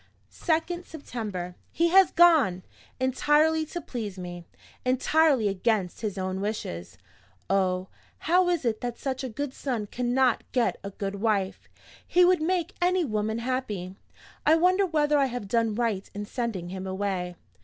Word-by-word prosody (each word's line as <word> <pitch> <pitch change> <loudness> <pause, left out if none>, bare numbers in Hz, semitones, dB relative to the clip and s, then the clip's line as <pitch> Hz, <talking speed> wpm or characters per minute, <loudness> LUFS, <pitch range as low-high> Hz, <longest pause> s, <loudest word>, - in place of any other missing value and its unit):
"2d 345 +1 -1
September. 215 - -6 0.2
He 335 +1 +2
has 380 +1 +6
gone! 310 - +5 0.4
Entirely 300 +5 +2
to 345 - -5
please 220 - -6
me 175 -1 -7 0.4
entirely 260 -1 +3
against 195 -1 0
his 210 -3 -3
own 190 0 -2
wishes. 200 - -4 0.5
Oh, 185 -1 +1 0.4
how 355 +2 +4
is 345 -6 0
it 220 -2 0
that 245 -1 -3
such 265 -1 -3
a 260 - -3
good 275 +4 -4
son 245 -7 -3
cannot 250 +2 +1
get 245 -2 +1
a 200 - -4
good 200 0 -4
wife! 200 -4 -1 0.4
He 360 0 +5
would 360 -2 +4
make 350 +2 0
any 360 0 +3
woman 215 -2 -1
happy. 230 -7 -3 0.5
I 310 - +5
wonder 365 +4 +3
whether 300 -3 +2
I 275 - +3
have 245 -5 -5
done 225 0 +1
right 225 -5 -1
in 205 0 -4
sending 210 -7 -3
him 190 +1 -5
away? 190 -2 -2
240 Hz, 155 wpm, -27 LUFS, 195-310 Hz, 0.5 s, has